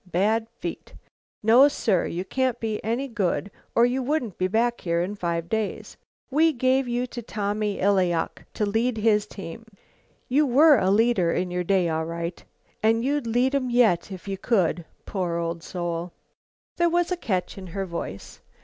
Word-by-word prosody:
Bad 220 Hz, +6 st, +1 dB
feet. -, -, -7 dB, 0.5 s
No, 240 Hz, +6 st, +7 dB
sir, 215 Hz, -10 st, +1 dB
you 180 Hz, +3 st, -4 dB
can't 255 Hz, +1 st, -1 dB
be 220 Hz, -2 st, -3 dB
any 235 Hz, +5 st, -1 dB
good, 205 Hz, -4 st, -1 dB, 0.2 s
or 235 Hz, -, +6 dB
you 250 Hz, +2 st, 0 dB
wouldn't 255 Hz, -, -2 dB
be 185 Hz, -, +2 dB
back 235 Hz, +4 st, 0 dB
here 170 Hz, -1 st, 0 dB
in 180 Hz, +4 st, -1 dB
five 170 Hz, -4 st, -2 dB
days. 220 Hz, +1 st, -3 dB, 0.4 s
We 315 Hz, +3 st, +4 dB
gave 260 Hz, +1 st, +2 dB
you 245 Hz, +1 st, -1 dB
to 245 Hz, -1 st, -7 dB
Tommy 210 Hz, -1 st, -2 dB
Illayok 185 Hz, -4 st, +1 dB
to 210 Hz, -, 0 dB
lead 225 Hz, +3 st, 0 dB
his 210 Hz, -1 st, +2 dB
team. 195 Hz, +2 st, -8 dB, 0.6 s
You 290 Hz, +3 st, +3 dB
were 290 Hz, +3 st, +6 dB
a 185 Hz, -, +1 dB
leader 205 Hz, -4 st, +3 dB
in 180 Hz, +1 st, -1 dB
your 180 Hz, 0 st, -1 dB
day 185 Hz, -1 st, +2 dB
all 160 Hz, 0 st, -1 dB
right, 170 Hz, +1 st, -5 dB, 0.4 s
and 225 Hz, +2 st, +2 dB
you'd 285 Hz, -2 st, 0 dB
lead 245 Hz, +4 st, +2 dB
'em 265 Hz, -3 st, 0 dB
yet 220 Hz, -7 st, +3 dB
if 190 Hz, +1 st, -9 dB
you 195 Hz, -1 st, -4 dB
could, 180 Hz, -7 st, +1 dB, 0.2 s
poor 180 Hz, -4 st, -2 dB
old 170 Hz, 0 st, -3 dB
soul!" 175 Hz, 0 st, -4 dB, 0.6 s
There 345 Hz, 0 st, +3 dB
was 350 Hz, +1 st, +1 dB
a -, -, +2 dB
catch 195 Hz, -, -2 dB
in 185 Hz, -, -9 dB
her 195 Hz, +3 st, -4 dB
voice. 170 Hz, -, -7 dB
210 Hz, 175 wpm, -25 LUFS, 180-245 Hz, 0.6 s, No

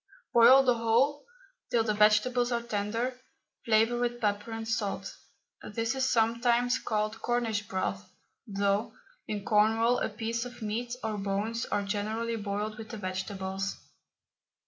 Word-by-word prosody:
Boil 245 Hz, +3 st, +8 dB
the 250 Hz, -2 st, +4 dB
whole 255 Hz, -, +2 dB, 0.4 s
till 230 Hz, -2 st, +2 dB
the 215 Hz, -1 st, 0 dB
vegetables 215 Hz, +4 st, +3 dB
are 235 Hz, -1 st, 0 dB
tender, 230 Hz, +3 st, -2 dB, 0.5 s
flavour 225 Hz, +2 st, +3 dB
with 240 Hz, 0 st, -1 dB
pepper 205 Hz, 0 st, -1 dB
and 225 Hz, 0 st, -5 dB
salt. 220 Hz, -3 st, -2 dB, 0.5 s
This 225 Hz, +3 st, -2 dB
is 265 Hz, -1 st, 0 dB
sometimes 235 Hz, +2 st, +2 dB
called 215 Hz, -1 st, -2 dB
Cornish 225 Hz, -3 st, -1 dB
broth, 190 Hz, 0 st, -3 dB, 0.4 s
though 200 Hz, +1 st, 0 dB, 0.3 s
in 205 Hz, -2 st, -4 dB
Cornwall 225 Hz, +3 st, +3 dB
a -, -, -1 dB
piece 230 Hz, +2 st, -3 dB
of 245 Hz, -2 st, -9 dB
meat 235 Hz, +3 st, -3 dB
or 215 Hz, -2 st, -2 dB
bones 205 Hz, +4 st, -2 dB
are 205 Hz, -, -1 dB
generally 215 Hz, +3 st, -2 dB
boiled 210 Hz, +1 st, -3 dB
with 220 Hz, -1 st, -8 dB
the 225 Hz, -, -6 dB
vegetables. 190 Hz, 0 st, -4 dB
225 Hz, 140 wpm, -29 LUFS, 205-240 Hz, 0.5 s, Boil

